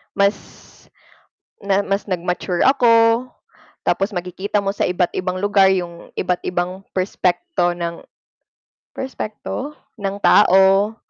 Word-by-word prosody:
Mas, 200 +1 +3 1.2
na 200 0 +1
mas 195 +1 -2
nag-mature 180 0 -1
ako, 235 -2 +4 0.6
tapos 195 +3 0
makikita 185 +3 -2
mo 195 - 0
sa 200 - -1
iba't 180 -1 0
ibang 185 0 -3
lugar 200 0 +3
yung 175 -2 -4
iba't 180 -1 -1
ibang 180 +1 -2 0.2
perspekto 180 - 0
ng, 170 -1 -4 0.9
perspekto? 265 +3 -6 0.3
ng 195 0 -2
tao, 195 +2 +5
195 Hz, 110 wpm, -20 LUFS, 180-205 Hz, 1.2 s, tao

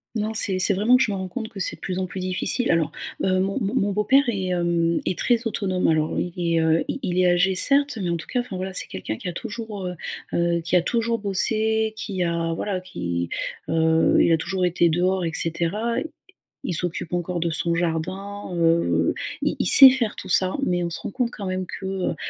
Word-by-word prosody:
Non, 215 0 -2
c'est 195 -4 +2
c'est 200 +2 +5
vraiment 215 +6 +3
que 260 - +4
je 215 - -1
me 195 - -2
rends 190 0 -4
compte 225 +2 -6
que 210 -4 -10
c'est - - -1
de - - -25
plus 185 -1 -3
en 185 - -1
plus 185 0 -7
difficile. 185 +6 0
Alors, 165 -3 +1 0.3
heu, 185 -1 +2
mon 195 +6 -1
mon 200 -2 -2
mon 200 +1 +1
beau-père 210 +8 +3
est, 195 -4 -2
hem, 170 -1 +1
est 185 - -1
très 240 -1 +1
autonome, 190 -4 -1
alors, 155 -1 +1
heu, 175 - -2
il 170 -1 -1
est, 165 - +3
heu, 160 0 +2
il - - -3
il 180 0 -1
est 180 - +4
âgé, 180 +2 +3
certes, 280 +4 +3
mais 180 - -2
en 170 - 0
tout 160 - -7
cas, 250 - -1
enfin, 240 -6 -5
voilà, 190 +1 -4
c'est - - -2
quelqu'un 110 +4 -5
qui - - -7
a 175 - -3
toujours, 220 -2 -6
heu 180 0 -4 0.4
heu, 170 0 +1
qui 175 +2 +2
a - - +3
toujours 230 +3 -1
bossé, 220 +2 0
qui 195 -4 -3
a, 170 -1 -1
voilà, 190 +3 -3
qui, 85 - -4 0.4
heu, 160 0 +2
il - - +3
a 165 - +4
toujours 180 +2 -2
été 175 0 +2
dehors, 180 +2 +1
et 165 - -2
cetera. 175 +9 -1 0.7
Il - - -3
s'occupe 170 0 -3
encore 175 0 -2
de 170 0 -1
son 170 +1 -1
jardin, 185 +5 -3
heu, 165 0 +2 0.3
il - - 0
il - - 0
sait 270 -2 +11
faire 240 -5 -1
tout - - -6
ça. 185 +1 +2
Mais 175 -1 0
on 170 - -2
se 165 - -6
rend - - -6
compte 250 -2 -1
quand 200 - -7
même 185 0 -2
que, 190 - -8 0.2
heu - - -1
185 Hz, 235 wpm, -23 LUFS, 170-210 Hz, 0.7 s, sait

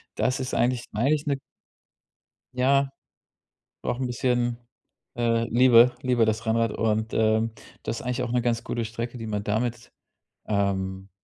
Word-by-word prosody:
das 130 - 0
ist 130 - -4
eigentlich 120 0 +1
eigentlich 140 +7 +1
'ne 140 -1 +1 1.2
ja, 135 +2 +2 0.9
braucht 120 - -2
'n 130 - -1
bisschen, 120 -1 0 0.6
äh, 115 -1 +2
Liebe 120 0 +6
Liebe 125 -3 +2
das 110 +1 -1
Rennrad 115 0 +2
und, 110 0 -1
ähm, 110 +1 +2 0.3
das - - -3
ist - - -8
eigentlich 125 0 -1
auch 120 - -3
'ne 125 0 +2
ganz 115 -1 0
gute 120 -1 -2
Strecke, 115 +2 -5
die 115 -1 -6
man 105 -1 -2
damit, 115 +3 -2 0.6
ähm, 95 -2 -1
115 Hz, 150 wpm, -26 LUFS, 110-125 Hz, 1.2 s, Liebe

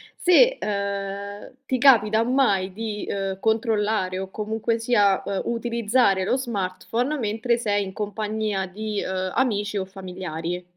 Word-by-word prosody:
se, - - +5
ehm, 200 0 -4
ti 255 -1 -1
capita 225 -5 +5
mai 210 -7 +2
di, 215 -1 -4
ehm, 195 -1 -3
controllare 215 -4 0
o 190 0 -5
comunque 220 +2 -2
sia, 210 -4 +2
ehm, 200 -1 -2
utilizzare 235 -3 +1
lo 250 +7 +1
smartphone 235 +4 -2
mentre 225 +1 0
sei 205 -3 0
in 190 - -8
compagnia 210 -1 -2
di, 210 +2 -4
ehm, 185 0 -2
amici 210 -5 0
o 190 - -2
familiari. 180 -2 -5
210 Hz, 135 wpm, -24 LUFS, 195-230 Hz, -, se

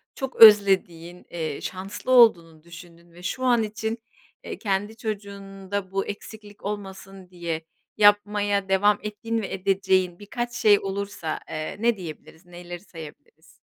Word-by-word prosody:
çok 265 -2 -5
özlediğin, 190 -5 +5
eee, 160 -4 -4
şanslı 195 +7 -5
olduğunu 170 -11 +4
düşündüğün 170 0 -14
ve 175 +1 -15
şu 255 +8 -4
an 240 -3 +3
için, 220 +1 -4 0.5
eee, - - -7
kendi 205 0 -2
çocuğunda 200 -3 -6
bu 195 0 -1
eksiklik 205 0 -10
olmasın 195 -2 -7
diye 170 -3 -5 0.3
yapmaya 205 -1 +3
devam 205 +2 +3
ettiğin 225 +2 -3
ve 200 - -5
edeceğin 190 -2 0
birkaç 240 +4 -5
şey 210 -3 +4
olursa, 195 -4 -4
eee, 155 0 -5
ne 230 0 +2
diyebiliriz, 165 -1 -10
neleri 175 0 -9
sayabiliriz? 160 -2 -14
195 Hz, 130 wpm, -24 LUFS, 175-210 Hz, 0.5 s, özlediğin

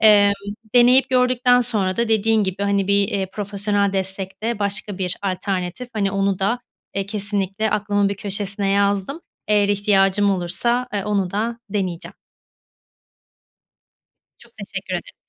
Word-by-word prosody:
Emm, 205 -2 +6 0.4
deneyip 250 +2 +6
gördükten 250 -1 +3
sonra 205 -6 +1
da 235 -1 0
dediğin 220 -1 +2
gibi 190 +1 -3
hani 200 -1 +1
bir, 200 0 +3
eee, 195 -1 -1
profesyonel 200 -1 0
destek 190 +1 -4
de 230 -1 -1
başka 200 -1 -1
bir 180 -2 -2
alternatif, 185 +3 -3
hani, 200 -3 0
onu 195 -1 0
da, 235 +6 0 0.3
eee, 195 0 -2
kesinlikle 205 0 -1
aklımın 205 -1 +1
bir 200 - -2
köşesine 200 0 -2
yazdım. 200 - 0 0.3
Eğer 205 -1 +3
ihtiyacım 200 0 +3
olursa, 235 +7 0
ııı, 200 - -1
onu 200 -3 0
da 230 +4 -2
deneyeceğim. 185 -5 -3 2.2
Çok - - -20
teşekkür - - -6
ederim. - - -6
200 Hz, 135 wpm, -21 LUFS, 195-215 Hz, 2.2 s, Emm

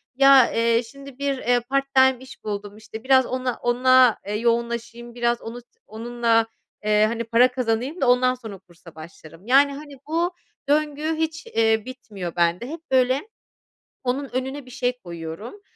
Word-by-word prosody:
ya, 275 -1 +6
eee, 230 +1 +2
şimdi, 275 +2 -13
bir, 280 -1 -1
eee, 245 -1 +1
part-time 265 +1 +2
iş 260 - -14
buldum, 205 0 -5
işte, 220 +1 -10
biraz 260 -1 +4
ona 255 -1 -3
ona, 250 0 +4
eee, 205 - -2
yoğunlaşayım, 235 +1 -2
biraz 240 0 0
onu 235 +2 -8 0.3
onunla, 230 +1 0 0.4
eee, 210 0 +4
hani, 230 +1 -3
para 230 +2 +4
kazanayım 250 +5 -2
da 265 - +2
ondan 255 +1 +3
sonra 225 -5 -9
kursa 175 -3 -18
başlarım. 160 +2 -13
Yani, 280 +3 +5
hani, 290 0 -10
bu 335 +3 0 0.4
döngü 305 +1 0
hiç, 320 0 -3
eee, 225 -1 +1
bitmiyor 210 -9 -8
bende. 175 +6 +1
Hep 320 +2 -7
böyle 260 - +2 0.7
onun 265 +2 -2
önüne 265 +2 -3
bir 255 - -14
şey 250 0 -2
koyuyorum. 170 - -8
245 Hz, 155 wpm, -23 LUFS, 225-265 Hz, 0.7 s, ya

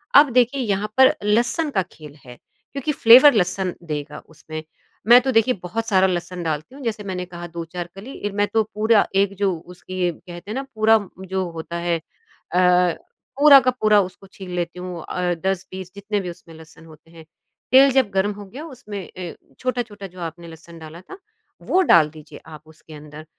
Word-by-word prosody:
अब 285 0 +8
देखिए 250 +2 +2
यहाँ 210 -1 -2
पर 265 0 +6
लहसुन 245 +9 +1
का 190 - +1
खेल 150 -2 -13
है, 125 0 -11 0.4
क्योंकि 280 +2 -2
फ्लेवर 260 +2 +8
लहसुन 185 -2 0
देगा 150 -2 -5
उसमें। 155 0 -9 0.4
मैं 240 +1 +9
तो 265 +1 -1
देखिए 235 +2 +3
बहुत 225 +6 -3
सारा 190 -3 +4
लहसुन 180 0 -4
डालती 160 - -4
हूँ। 280 - -11
जैसे 215 -3 -3
मैंने 180 -2 -4
कहा 175 -1 -9
2-4 170 +1 -7
कली 220 +8 -10
इर 205 - -5
मैं 205 0 +1
तो 220 - +4
पूरा 220 0 +3
एक 200 0 +2
जो 200 -2 +1 0.2
उसकी 180 0 -3
कहते 175 +5 -11
हैं - - -4
ना 270 - -3
पूरा 220 +1 +5 0.3
जो 190 0 -2
होता 165 +1 -6
है। 170 -1 0
अ, - - -25 1.4
पूरा 285 -2 +9
का 255 -1 +1
पूरा 215 -4 +3
उसको 190 +1 -8
छील 190 -2 -10
लेती 175 0 -4
हूँ 180 -3 -7
अ, 180 -1 -1
10-20 185 0 -4
जितने 205 +1 -3
भी 180 - -5
उसमें 170 -1 -12
लहसन 165 0 -16
होते 160 +1 -18
हैं। 165 -1 -14 0.5
तेल 270 +1 +7
जब 260 -5 +2
गर्म 195 +2 +1
हो 205 0 -10
गया 270 +11 -9
उसमें 220 -8 -8
अ, 180 -2 -8 0.3
छोटा-छोटा 230 -6 -4
जो 180 0 -15
आपने 170 +1 -7
लहसुन 165 +1 -13
डाला 160 +2 -11
था 385 - -12 0.4
वो 375 - +2
डाल 155 -3 +6
दीजिए 155 -1 -13
आप 155 -2 -12
उसके 160 0 -16
अंदर। 150 +1 -11
190 Hz, 190 wpm, -21 LUFS, 170-225 Hz, 1.4 s, मैं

